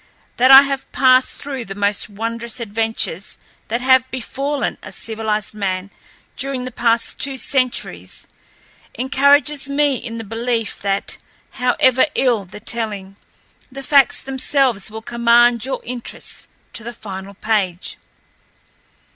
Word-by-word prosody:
That 255 +2 +5
I 270 +1 +11
have 275 -1 -4
passed 255 0 +4
through 270 -4 -5
the 195 -1 -7
most 205 +1 +1
wondrous 230 +3 -4
adventures 220 -4 -1 0.3
that 235 +2 -2
have 260 0 +4
befallen 275 +3 -3
a - - -10
civilized 215 -2 -2
man 195 -2 -3 0.4
during 270 -2 -3
the 255 - -5
past 230 -1 0
two 275 -1 0
centuries 240 - -2 0.7
encourages 280 +3 +3
me 280 -1 +2
in 230 -1 -7
the 225 - -5
belief 225 0 -3
that, 195 0 -1 0.3
however 255 +1 +3
ill 235 -6 +2
the 185 +3 -11
telling, 210 -4 -4 0.6
the 275 +1 -8
facts 280 -1 +4
themselves 265 -5 0
will 220 +1 -8
command 235 0 +3
your 270 - -3
interest 245 0 -6 0.2
to 225 - -4
the 240 +2 -6
final 200 -3 -8
page. 195 -4 -1
235 Hz, 130 wpm, -19 LUFS, 215-260 Hz, 0.7 s, I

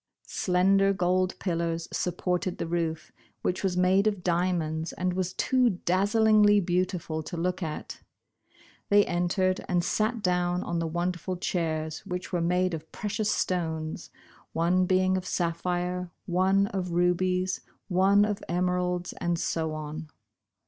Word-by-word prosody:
Slen 185 +2 +2
der 195 0 +4
gold 185 0 +1
pillars 170 -2 -2
supported 180 0 -1
the - - -2
roof, 165 -1 -2 0.3
which 180 - -1
was 185 -2 0
made 190 +3 +4
of 205 -4 -1
diamonds, 170 -3 0
and 180 0 -1
was 185 0 -2
too 255 +4 +2 0.2
dazzlingly 205 +2 +4
beauti 180 0 0
ful 160 -1 -4
to 170 +3 -7
look 180 +3 -1
at. 155 -3 -5 0.9
They 205 0 +6
entered 180 +2 0
and 175 -2 +2
sat 215 +4 0
down 180 0 +1
on 170 -1 -2
the 165 - -1
wonderful 175 +2 -2
chairs, 160 -3 -2
which 180 -1 -5
were 175 - +1
made 180 +1 +1
of 160 0 -6
precious 210 0 -2
stones, 160 -4 -2 0.4
one 180 +3 +2
being 185 0 +3
of 185 - -5
sapphire, 180 +1 -1 0.2
one 190 +2 +3
of 180 -3 -3
rubies, 180 +1 +1 0.3
one 195 +2 +4
of 210 -1 -3
emeralds, 180 0 0
and 175 0 0
so 160 -1 -1
on. 155 +1 -6
180 Hz, 140 wpm, -28 LUFS, 170-185 Hz, 0.9 s, They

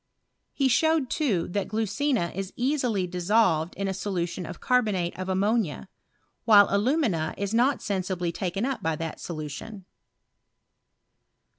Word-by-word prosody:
He 275 - +1
showed, 315 +1 +2
too, 220 - 0
that 195 +1 -2
glucina 220 - -1
is 195 0 -5
easily 245 -7 0
dissolved 180 -2 +1
in 195 +1 -2
a 190 - -1
solution 180 -3 -3
of - - -8
carbonate 210 -9 +1
of 185 0 -5
ammonia, 195 -2 0 0.5
while 205 -3 +7
alumina 200 - +1
is 200 +1 -3
not 250 +5 +2
sensibly 185 -3 -2
taken 190 +5 -2
up 265 -5 -2
by 160 -3 0
that 165 0 -5
solu 155 -3 -5
tion. 195 +7 -8
200 Hz, 135 wpm, -26 LUFS, 175-235 Hz, 0.5 s, while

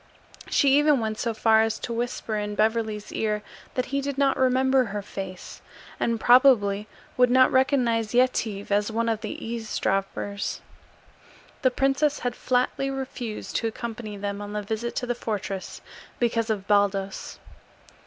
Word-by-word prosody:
She 280 0 +4
even 295 -2 +4
went 220 -1 -3
so 235 - 0
far 220 0 +4
as 225 0 0
to 235 - -5
whisper 235 -2 -3
in 210 0 -3
Beverly's 215 -1 0
ear 210 -1 -1 0.3
that 255 - 0
he 280 - +1
did 280 0 -4
not 275 -1 +3
remember 260 0 +3
her 205 -1 -4
face, 190 -2 -8 0.4
and 230 -1 0
probably 215 -6 +5 0.3
would 250 -1 +5
not 255 +1 +5
recognize 250 -4 +2
Yetive 225 -5 +1
as 205 +2 +2
one 230 +1 0
of 225 -2 0
the 215 - -4 0.2
eavesdroppers. 200 -3 -2 1.0
The 260 - +4
princess 275 +3 +1
had 245 -1 -3
flatly 255 +2 0
refused 260 -5 -5
to 230 - -1
accompany 220 -2 -6
them 200 0 -4
on 205 0 -6
the 210 0 -3
visit 220 +3 -3
to 250 - -1
the 245 - 0
fortress 200 -5 -5 0.4
because 230 -1 +1
of 205 -3 -1
Baldos. 200 -1 0
225 Hz, 155 wpm, -25 LUFS, 210-255 Hz, 1.0 s, probably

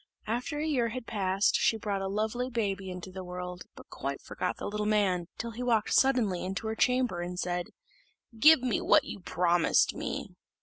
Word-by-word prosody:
After 245 +7 -2
a 300 - -1
year 255 -7 +1
had 250 +1 -6
passed 195 -3 +1
she 225 - +2
brought 205 -2 -2
a 195 - -2
lovely 220 +5 -1
baby 200 -5 -2
into 180 +1 -7
the 190 0 -7
world, 180 0 -6
but - - -14
quite - - -4
forgot - - -4
the - - -6
little 210 0 -2
man, 190 -5 +1
till 235 - -4
he 230 +2 -7
walked 230 -4 +1
suddenly 240 -9 +3
into 190 +4 -4
her 220 0 -2
chamber, 250 -7 +1
and 180 +1 -5
said, 175 -1 -2 0.7
"Give 310 +2 +8
me 250 -5 0
what - - +5
you - - -7
promised 175 -1 +2
me." - - -4
210 Hz, 190 wpm, -29 LUFS, 185-235 Hz, 0.7 s, Give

